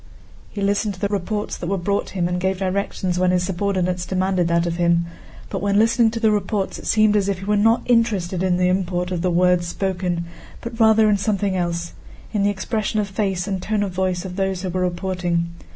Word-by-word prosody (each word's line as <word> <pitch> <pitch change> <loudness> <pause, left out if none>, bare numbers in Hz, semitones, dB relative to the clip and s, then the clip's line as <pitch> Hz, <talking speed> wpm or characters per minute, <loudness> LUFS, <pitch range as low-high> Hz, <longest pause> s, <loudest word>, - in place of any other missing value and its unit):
He 205 - -6
listened 200 +1 0
to - - -15
the 200 - -1
reports 205 +1 -2
that 175 - -5
were 195 +2 0
brought 200 +3 -1
him 175 -1 +1
and 180 0 -1
gave 190 0 0
directions 185 -1 -1
when 185 0 +3
his 180 0 +2
subordinates 185 -1 -1
demanded 185 -1 0
that 170 0 +2
of 170 0 -2
him; 170 -1 +2 0.5
but - - -3
when 200 0 +1
listening 230 +1 +4
to 230 +1 -4
the 220 -1 +3
reports 205 -1 -1
it - - -9
seemed 215 -1 +4
as 200 -1 +2
if 195 - 0
he 190 - -8
were 210 +1 +2
not 225 +3 +3
interested 205 -7 +1
in 185 -1 +2
the 180 0 +2
import 180 -1 -1
of 175 -2 -2
the 180 - +1
words 180 0 +3
spoken, 180 -2 -2 0.3
but 235 0 -7
rather 220 -1 +5
in 210 -1 +3
something 200 -1 0
else—in 175 +4 -4
the 200 - +3
expression 215 +2 -2
of 205 -1 -1
face 190 -2 -1
and 190 -2 -2
tone 210 +1 0
of 195 - -3
voice 185 0 -1
of 180 0 -7
those 190 -1 -1
who 185 - -2
were 185 +1 -1
reporting. 175 -1 -1
190 Hz, 220 wpm, -21 LUFS, 180-205 Hz, 0.5 s, rather